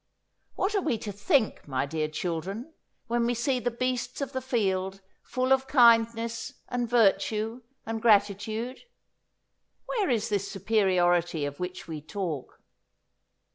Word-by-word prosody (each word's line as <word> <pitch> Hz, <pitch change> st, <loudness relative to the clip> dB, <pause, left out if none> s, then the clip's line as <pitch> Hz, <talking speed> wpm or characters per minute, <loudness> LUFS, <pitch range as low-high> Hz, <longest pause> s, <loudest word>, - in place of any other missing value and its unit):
What 390 Hz, +3 st, 0 dB
are 400 Hz, -, +2 dB
we 305 Hz, -9 st, 0 dB
to 210 Hz, -1 st, -5 dB
think, 205 Hz, -, +1 dB
my 135 Hz, -1 st, 0 dB
dear 155 Hz, +1 st, -2 dB
children, 180 Hz, -, -4 dB, 0.3 s
when 235 Hz, 0 st, 0 dB
we 245 Hz, -, +1 dB
see 250 Hz, +2 st, 0 dB
the 245 Hz, -, 0 dB
beasts 250 Hz, +1 st, -2 dB
of 275 Hz, -2 st, -3 dB
the 260 Hz, -, -2 dB
field 195 Hz, -6 st, -1 dB, 0.2 s
full 255 Hz, +1 st, +1 dB
of 265 Hz, 0 st, +1 dB
kindness 230 Hz, -3 st, +4 dB, 0.2 s
and 245 Hz, -1 st, -1 dB
virtue 220 Hz, +1 st, +2 dB, 0.2 s
and 225 Hz, 0 st, -3 dB
gratitude? 215 Hz, +3 st, +2 dB, 1.1 s
Where 420 Hz, -7 st, 0 dB
is 225 Hz, -4 st, +1 dB
this 200 Hz, -1 st, -1 dB
superiority 175 Hz, -5 st, +2 dB
of 145 Hz, 0 st, -6 dB
which 180 Hz, 0 st, -5 dB
we 155 Hz, -2 st, -5 dB
talk? 165 Hz, -4 st, -5 dB
220 Hz, 135 wpm, -28 LUFS, 185-245 Hz, 1.1 s, kindness